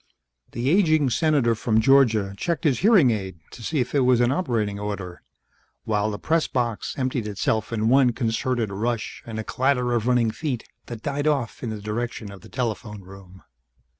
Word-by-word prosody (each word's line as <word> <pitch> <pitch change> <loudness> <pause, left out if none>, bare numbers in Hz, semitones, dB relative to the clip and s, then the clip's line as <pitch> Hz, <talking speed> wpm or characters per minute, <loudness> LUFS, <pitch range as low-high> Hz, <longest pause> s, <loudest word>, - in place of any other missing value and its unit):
The 125 +4 0
aging 155 -7 +3
Senator 145 -6 +2
from 110 0 +1
Georgia 110 -6 +4
checked 170 - -2
his 145 -6 +2
hearing 190 - +5
aid 95 -5 -4
to - - -11
see 150 +6 -1
if 125 - -2
it 145 - +3
was 125 -2 +4
in 120 +1 +3
operating 115 - -1
order, 100 -4 -5 0.6
while 105 -1 0
the 105 - -4
press 160 +7 +1
box 120 -6 -2
emptied 130 -4 -1
itself 105 +2 -1
in 110 -1 0
one 130 0 +5
concerted 115 -1 -1
rush 115 +3 -3
and 110 -1 -6
a 110 - -3
clatter 125 0 0
of 120 -1 0
running 120 -3 +3
feet 130 -3 -4 0.2
that 115 -2 -8
died 145 0 -1
off 140 -7 -1
in 120 - -3
the 110 -1 -5
direction 105 0 -4
of 100 -2 -12
the - - -14
telephone 110 -4 -4
room. 95 0 -14
120 Hz, 185 wpm, -24 LUFS, 105-135 Hz, 0.6 s, hearing